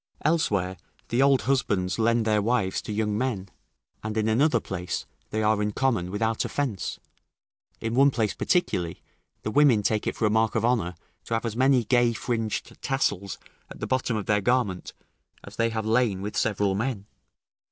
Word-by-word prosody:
Elsewhere 100 Hz, -, +1 dB, 0.3 s
the 120 Hz, +2 st, +2 dB
old 135 Hz, -3 st, +4 dB
husbands 105 Hz, -8 st, 0 dB
lend 115 Hz, 0 st, +2 dB
their 105 Hz, -1 st, +2 dB
wives 105 Hz, -3 st, 0 dB
to -, -, -7 dB
young 105 Hz, 0 st, 0 dB
men; 105 Hz, -5 st, -2 dB, 0.5 s
and 110 Hz, 0 st, -4 dB
in 110 Hz, 0 st, +1 dB
another 120 Hz, +3 st, +3 dB
place 90 Hz, -3 st, -4 dB, 0.2 s
they 110 Hz, 0 st, -1 dB
are 105 Hz, 0 st, +2 dB
in 105 Hz, 0 st, 0 dB
common 110 Hz, -7 st, 0 dB
without 110 Hz, +3 st, 0 dB
offence; 125 Hz, -, -3 dB, 0.8 s
in 115 Hz, 0 st, -3 dB
one 135 Hz, +3 st, +6 dB
place 110 Hz, -6 st, 0 dB
particularly, 90 Hz, -, 0 dB, 0.4 s
the 110 Hz, -, -2 dB
women 130 Hz, -6 st, +4 dB
take 110 Hz, +1 st, 0 dB
it -, -, -1 dB
for 110 Hz, -, 0 dB
a 105 Hz, -, +3 dB
mark 110 Hz, 0 st, +2 dB
of 110 Hz, 0 st, +1 dB
honour 110 Hz, -8 st, +1 dB, 0.3 s
to 115 Hz, -, -1 dB
have 115 Hz, -, -2 dB
as 115 Hz, -2 st, -3 dB
many 130 Hz, 0 st, +4 dB
gay 120 Hz, +1 st, +3 dB
fringed 115 Hz, -2 st, -3 dB
tassels 100 Hz, -8 st, -1 dB, 0.3 s
at -, -, -11 dB
the -, -, -3 dB
bottom 125 Hz, -3 st, 0 dB
of 105 Hz, -, -3 dB
their 105 Hz, -1 st, +2 dB
garment, 105 Hz, -5 st, 0 dB, 0.5 s
as -, -, -12 dB
they 115 Hz, 0 st, +2 dB
have 110 Hz, -1 st, -3 dB
lain 110 Hz, -4 st, +1 dB
with 105 Hz, -, -5 dB
several 105 Hz, -3 st, +1 dB
men. 110 Hz, -1 st, -2 dB
110 Hz, 180 wpm, -26 LUFS, 105-125 Hz, 0.8 s, one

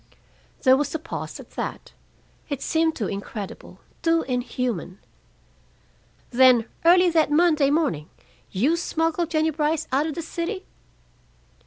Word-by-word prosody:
There 260 Hz, -1 st, +7 dB
was 290 Hz, +3 st, -1 dB
a -, -, +2 dB
pause 320 Hz, +1 st, -6 dB
at -, -, -13 dB
that. -, -, -6 dB, 0.6 s
It 285 Hz, -3 st, -3 dB
seemed 320 Hz, 0 st, +1 dB
too 220 Hz, -, -2 dB
incredible, 200 Hz, 0 st, -7 dB, 0.2 s
too 330 Hz, 0 st, +2 dB
inhuman. 245 Hz, -7 st, -3 dB, 1.3 s
"Then, 250 Hz, -2 st, +6 dB, 0.2 s
early 355 Hz, +1 st, +6 dB
that 320 Hz, -3 st, +3 dB
Monday 305 Hz, -3 st, +4 dB
morning, 280 Hz, -, 0 dB, 0.4 s
you 275 Hz, -, +1 dB
smuggled 330 Hz, 0 st, -1 dB
Jennie 315 Hz, -1 st, +1 dB
Brice 305 Hz, +1 st, -1 dB
out 280 Hz, +4 st, +2 dB
of 310 Hz, -, -4 dB
the 335 Hz, -, -4 dB
city?" 360 Hz, +4 st, -4 dB
305 Hz, 130 wpm, -24 LUFS, 255-330 Hz, 1.3 s, There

